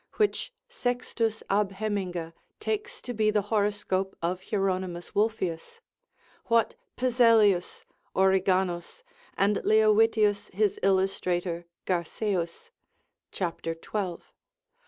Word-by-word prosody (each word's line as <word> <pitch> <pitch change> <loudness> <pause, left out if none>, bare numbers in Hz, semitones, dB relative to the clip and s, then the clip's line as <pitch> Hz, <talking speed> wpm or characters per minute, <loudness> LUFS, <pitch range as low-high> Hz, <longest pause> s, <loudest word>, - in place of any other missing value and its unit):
which 425 +2 0 0.2
Sextus 235 -3 -2
ab 200 0 +1
Heminga 190 -5 -3 0.3
takes 440 +2 -3
to 245 - -4
be 215 -1 +2
the 210 -1 +2
horoscope 200 -2 0
of 180 +2 -2
Hieronymus 185 -3 -1
Wolfius, 210 - -1 0.7
what 230 -1 +3 0.2
Pezelius, 230 -7 +3 0.3
Origanaus 190 - +1 0.3
and 200 +1 +3
Leovitius 215 -1 +3
his 205 +1 +1
illustrator 185 -3 0 0.2
Garceus, 185 - -2 0.6
cap. 175 -3 -3
12. 170 +2 -4
200 Hz, 90 wpm, -28 LUFS, 180-220 Hz, 0.7 s, what